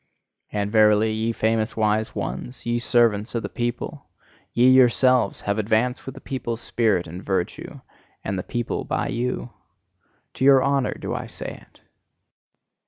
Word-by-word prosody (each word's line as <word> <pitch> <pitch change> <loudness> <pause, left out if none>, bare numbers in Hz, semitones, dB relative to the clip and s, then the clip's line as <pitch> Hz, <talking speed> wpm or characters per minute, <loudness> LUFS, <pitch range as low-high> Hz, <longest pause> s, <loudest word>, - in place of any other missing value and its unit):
And 105 -1 -2
verily, 110 0 +4
ye 110 +1 -1
famous 110 -1 0
wise 110 0 +1
ones, 95 - -5
ye 120 0 0
servants 115 -2 +2
of 115 - -1
the - - -4
people! 120 0 -4 0.4
Ye 120 +1 +4
yourselves 130 -1 +4
have 100 +1 -1
advanced 115 +5 0
with 135 - -6
the - - -11
people's 120 -4 -4
spirit 110 -8 +1
and 85 +3 -8
virtue 95 -3 -3 0.4
and 100 - -2
the 90 - -2
people 120 +5 -3
by - - -2
you! 125 0 -3 0.8
To - - -4
your 135 -1 +6
honour 140 -1 +1
do - - -5
I - - -4
say - - -8
it! - - -26
115 Hz, 155 wpm, -23 LUFS, 105-125 Hz, 0.8 s, your